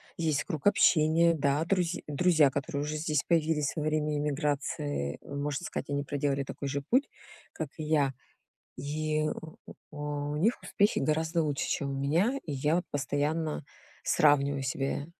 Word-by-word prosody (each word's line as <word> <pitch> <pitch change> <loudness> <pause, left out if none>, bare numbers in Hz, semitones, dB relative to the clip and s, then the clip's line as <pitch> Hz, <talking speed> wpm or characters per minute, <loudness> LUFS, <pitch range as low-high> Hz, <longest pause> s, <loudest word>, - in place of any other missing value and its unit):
есть 155 -3 0
круг 160 -2 -2
общения, 170 -3 +5
да, 145 0 +1
друз 180 -2 +1
друзья, 155 -1 +4
которые 140 +1 -2
уже 150 +1 -3
здесь 150 -2 0
появились 160 -4 +1
во 160 - -2
время 150 0 0
иммиграции, 145 - -1
можно 140 0 -3
сказать, 140 - -5
они 140 0 -1
проделали 140 -1 -1
такой 140 +1 -6
же 140 +1 -2
путь, 255 - +2 0.4
как 155 -4 -4
и 155 - -4
я, 150 -3 +2 0.6
и 155 +3 -1
у 160 -1 -8 0.4
у 145 -1 -3
них 215 +10 +1
успехи 205 +1 +2
гораздо 160 +3 +1
лучше, 145 -3 -1
чем 140 - -1
у 135 0 -3
меня. 175 - +2
И 155 - -4
я 150 +6 +1
постоянно 150 +3 -1 0.4
сравниваю 140 -2 +3
себя 135 +2 -2
150 Hz, 150 wpm, -29 LUFS, 140-160 Hz, 0.6 s, общения